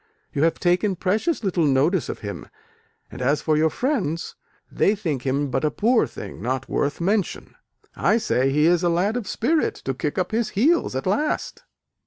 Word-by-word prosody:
You 145 - -1
have 165 - 0
taken 180 +3 +2
precious 215 - 0
little 180 -4 +1
notice 150 +5 +2
of - - -5
him, 100 -1 -6 0.6
and - - -8
as 140 +4 +2
for 155 - +2
your 160 +1 +3
friends, 185 - -2 0.4
they 205 - +2
think 155 - -3
him 140 +1 0
but 135 +3 -1
a 155 - +3
poor 230 +8 +2
thing - - -9
not 130 +3 -2
worth 145 - -1
mention. 195 +2 -1 0.4
I - - +2
say 135 - +1
he 150 +2 +3
is 175 0 +4
a 175 - +2
lad 185 +6 +1
of 245 -4 -3
spirit 305 +7 0
to 135 - -1
kick 145 +3 -3
up 185 - -1
his 225 0 0
heels 305 - +2
at 130 - -3
last." 295 +11 -1
175 Hz, 190 wpm, -23 LUFS, 145-215 Hz, 0.6 s, is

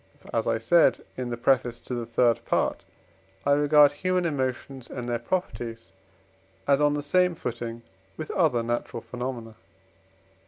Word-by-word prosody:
For, - - -10
as 115 - 0
I - - +2
said 160 +10 +3
in 125 -1 -4
the 120 - -3
preface 120 -1 +1
to - - -6
the 120 -2 -3
third 115 -1 +2
Part, - - 0 0.6
I 140 - +3
regard 145 0 +6
human 180 +4 0
emotions 130 -3 -3
and 125 -2 -6
their 120 -1 -1
properties 120 -6 -4 0.8
as 140 0 +4
on 145 0 +3
the 145 - -3
same 180 +3 +2
footing 115 -4 -5 0.3
with 155 - -5
other 150 -10 +2
natural 120 0 -3
phenomena. 120 -1 -5
125 Hz, 155 wpm, -26 LUFS, 120-145 Hz, 0.8 s, regard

